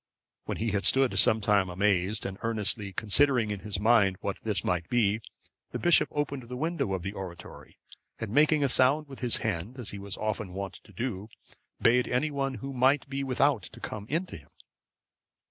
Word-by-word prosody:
When - - -3
he 115 0 -1
had 100 0 -1
stood 135 -1 +4
some 110 0 +4
time 100 -3 +2
amazed, 95 +2 +1
and 95 0 -5
earnestly 105 -2 -1
considering 110 +3 +2
in 105 - -3
his 100 0 -4
mind 105 -3 +4
what - - -3
this - - -1
might 85 -2 -1
be, 115 -3 +2 0.5
the - - -1
bishop 175 -1 +4
opened 145 -2 -2
the 125 +1 -8
window 155 - -1
of 95 -3 -3
the 95 - -3
oratory, 95 -3 -10 0.4
and 110 -3 -5
making 150 +3 +4
a - - +3
sound 135 +4 +4
with 135 -2 -10
his 125 -2 +1
hand, 110 +4 -3
as 120 -4 -4
he 100 - -7
was 100 0 -6
often 105 -3 -3
wont 100 0 -4
to - - -17
do, 105 0 -4 0.5
bade 125 +1 +3
anyone 135 0 -1
who 135 +5 -6
might 130 +3 +2
be 135 0 -3
without 135 -2 +2
to - - -12
come 105 -1 -6
in 165 +6 0
to - - -9
him. - - -18
110 Hz, 195 wpm, -28 LUFS, 100-135 Hz, 0.5 s, stood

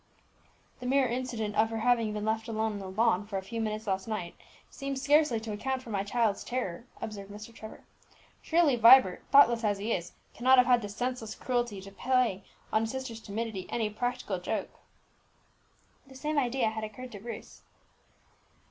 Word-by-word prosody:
"The 250 - -5
mere 270 0 +3
incident 235 -4 -3
of 220 +1 +3
her 225 - -3
having 230 -2 +2
been 210 0 -3
left 220 +1 -1
alone 220 -1 -1
on 205 - -5
the 190 -1 -7
lawn 210 0 +2
for 200 -2 -3
a 190 - -4
few 230 +4 -4
minutes 215 0 -3
last 190 -1 -2
night 210 -6 -4 0.3
seems 275 -1 -5
scarcely 290 -3 +3
to 220 -1 -5
account 260 +5 -2
for 230 - -9
my 195 -1 0
child's 215 0 0
terror," 240 -5 -4
observed 200 -2 -6
Mr. 210 +3 -10
Trevor. 220 -1 -11 0.6
"Surely 325 -5 +3
Vibert, 235 -4 +7
thoughtless 240 -4 +6
as 205 -2 +1
he 210 +4 -1
is, 175 0 -4 0.2
cannot 260 +2 +4
have 250 - +7
had 245 -1 +4
the 205 - -5
senseless 245 +1 -3
cruelty 240 -5 -1
to 195 +1 -11
play 245 -3 +1 0.3
on 220 - +4
his 225 0 -2
sister's 260 -4 -5
timidity 215 -2 -4
any 220 -3 -1
practical 215 -4 -2
joke." 195 +2 -4 1.3
The 265 - -15
same 300 +3 0
idea 245 -3 +1
had 220 0 -5
occurred, 245 +4 -7
to 205 - -8
Bruce. 230 +3 -9
225 Hz, 185 wpm, -30 LUFS, 210-250 Hz, 1.3 s, Vibert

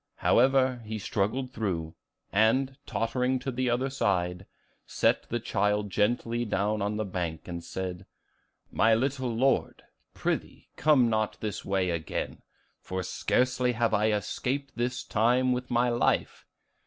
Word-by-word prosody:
However, 130 0 +3
he 110 0 -4
struggled 110 +5 -1
through, 85 -9 -2 0.4
and, 130 +6 +3
tottering 125 +3 0
to 135 +1 -4
the 130 0 0
other 130 +3 0
side, 90 -7 0 0.4
set - - +1
the 120 - -1
child 105 -2 0
gently 115 +3 +1
down 105 -1 0
on 105 +1 -1
the 110 - -1
bank, 85 -4 -4
and 85 -1 -5
said, 95 +1 -5 0.6
'My 110 0 +4
little 130 +1 -1
Lord, 130 +4 +1 0.3
prithee, - - -3
come 145 -5 +4
not 110 -1 0
this 105 -3 -4
way 95 -2 0
again, 85 -2 -4 0.4
for 95 0 -4
scarcely 125 +6 +1
have 115 0 +1
I 105 +1 +3
escaped 130 +7 -2
this 125 +1 -2
time 125 +4 +2
with 125 0 -2
life. 120 0 +1
115 Hz, 135 wpm, -28 LUFS, 100-125 Hz, 0.6 s, My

